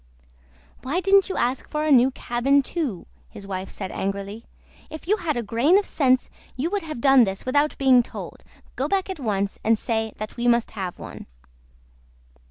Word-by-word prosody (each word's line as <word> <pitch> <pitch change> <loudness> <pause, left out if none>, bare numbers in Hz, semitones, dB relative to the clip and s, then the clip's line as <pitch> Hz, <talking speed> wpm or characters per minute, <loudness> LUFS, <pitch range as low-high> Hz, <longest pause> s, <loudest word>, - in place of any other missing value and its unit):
"Why 285 +8 -1
didn't 390 +1 +4
you - - -3
ask 250 +2 -1
for 300 0 -2
a 310 - +1
new 255 -1 +6
cabin 270 +2 +1
too?" 270 - -3 0.2
his 195 - -11
wife 190 -1 -5
said 190 -2 -6
angrily. 200 +3 -4 0.4
"If 315 +1 -9
you 420 +3 +3
had 330 -6 -2
had - - -3
a 240 - -1
grain 240 - +3
of 405 - +1
sense 260 -3 +1 0.2
you 300 +7 -2
would 410 -1 0
have 310 -5 -6
done 270 -2 +6
this 195 -2 -3
without 290 +3 +1
being 260 -2 +5
told. - - -9 0.3
Go - - -1
back 385 -1 0
at 375 - -7
once, 200 -5 -2
and 225 0 +3
say 220 -1 -2
that 215 +3 -7
we 240 0 -1
must 235 -1 +2
have 190 -4 -5
one. - - -10
255 Hz, 190 wpm, -24 LUFS, 220-305 Hz, 0.4 s, new